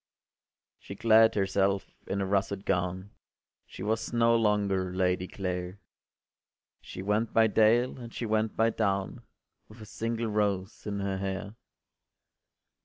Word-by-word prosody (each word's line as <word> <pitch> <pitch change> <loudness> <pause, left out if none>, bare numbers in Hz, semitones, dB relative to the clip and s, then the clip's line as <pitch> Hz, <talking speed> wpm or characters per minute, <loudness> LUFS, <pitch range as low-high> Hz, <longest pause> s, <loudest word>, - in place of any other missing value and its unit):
” - - -64
She 100 - -9
clad 110 +1 +5
herself 100 0 0 0.2
in 100 - -2
a - - 0
russet 100 0 -1
gown, 90 +2 -1 0.6
She 95 - -9
was 110 +2 -1
no 115 -1 +3
longer 100 -4 +1
Lady 90 0 0
Clare: 90 0 -4 1.0
She 95 - -8
went 105 +3 0
by 115 - +5
dale, 115 +4 +3
and 120 -1 -9
she 120 - -4
went 110 0 0
by 115 +1 +3
down, 100 -3 -1 0.5
With 110 +2 -15
a 110 - -9
single 115 +2 -3
rose 105 -2 -1
in 100 -1 -3
her 95 -1 -2
hair. 95 +1 -4
100 Hz, 140 wpm, -29 LUFS, 95-110 Hz, 1.0 s, clad